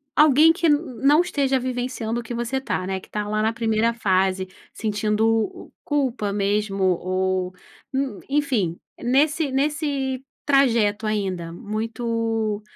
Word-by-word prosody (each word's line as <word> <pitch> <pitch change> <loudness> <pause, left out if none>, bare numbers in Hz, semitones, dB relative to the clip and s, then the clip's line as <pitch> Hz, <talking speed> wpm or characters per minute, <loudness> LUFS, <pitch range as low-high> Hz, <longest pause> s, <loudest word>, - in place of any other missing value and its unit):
alguém 305 +2 +6
que 340 -1 +1
n 295 -1 +5 0.3
não 295 +4 +6
esteja 280 -7 +1
vivenciando 245 -2 -3
o - - -6
que 240 - -6
você 240 +3 -2
tá, 185 -8 -2
né, 190 0 -2
que - - -18
tá 210 -1 -3
lá 215 0 0
na 220 +1 +1
primeira 230 0 +1
fase, 190 -3 +1 0.3
sentindo, 220 - 0
culpa 255 -8 0
mesmo 200 -1 0
ou 185 0 0 0.4
n 265 -6 -2
enfim, 250 - 0 0.2
nesse 290 +4 +2
nesse 275 -2 -1 0.2
trajeto 230 -7 +3
ainda, 190 -5 -2
muito 225 +1 -2
230 Hz, 130 wpm, -23 LUFS, 205-270 Hz, 0.4 s, alguém